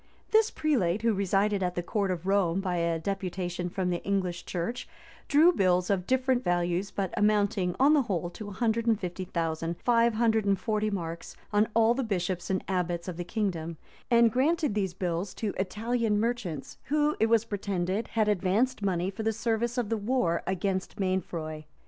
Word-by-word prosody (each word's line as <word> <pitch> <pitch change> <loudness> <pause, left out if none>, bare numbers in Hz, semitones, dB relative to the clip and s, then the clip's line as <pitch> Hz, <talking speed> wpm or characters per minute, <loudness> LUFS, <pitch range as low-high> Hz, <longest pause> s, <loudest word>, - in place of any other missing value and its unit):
This 440 0 +5
prelate, 220 - 0
who 230 -1 +3
resided 200 +1 +1
at 180 -1 -1
the 175 - -2
court 200 +1 -1
of 180 -1 -3
Rome 195 -3 +2
by 185 -2 -1
a 170 -1 +1
deputation 180 0 -3
from 180 0 -1
the 175 - -3
English 185 -3 -1
church, 180 +8 -3 0.4
drew 315 +4 +6
bills 180 - +2
of 185 -2 0
different 260 -1 +2
values 175 +2 0
but 195 -3 -3
amounting 205 -3 +2
on 280 +3 +6
the 300 - +5
whole 180 -7 -2
to 210 +4 -8
a - - -7
hundred 230 +3 0
and 225 -3 +3
fifty 185 -1 -4
thousand 165 -1 -2
five 235 -1 +4
hundred 220 -1 +2
and 195 -2 +2
forty 215 +1 0
marks 170 -4 -5 0.2
on 210 +1 +4
all 230 0 +5
the 265 +2 -1
bishops 185 -4 -2
and 190 -1 0
abbots 175 -2 -1
of 180 - -4
the 175 - -4
kingdom; 175 -5 -3 0.3
and 235 -1 +5
granted 300 +1 +2
these 190 -4 -1
bills 180 +1 -2
to 215 -3 -2
Italian 215 +2 0
merchants, 220 - -3
who, 300 +2 +1
it 220 - +4
was 230 0 +3
pretended, 200 -1 -2
had 220 -2 +1
advanced 210 +6 +1
money 185 -1 0
for 200 - -6
the 220 0 +1
service 230 +2 -1
of 240 -4 -1
the 225 - 0
war 205 -6 0
against 190 +1 -2
Mainfroy. 165 -5 -2
195 Hz, 185 wpm, -28 LUFS, 180-225 Hz, 0.4 s, drew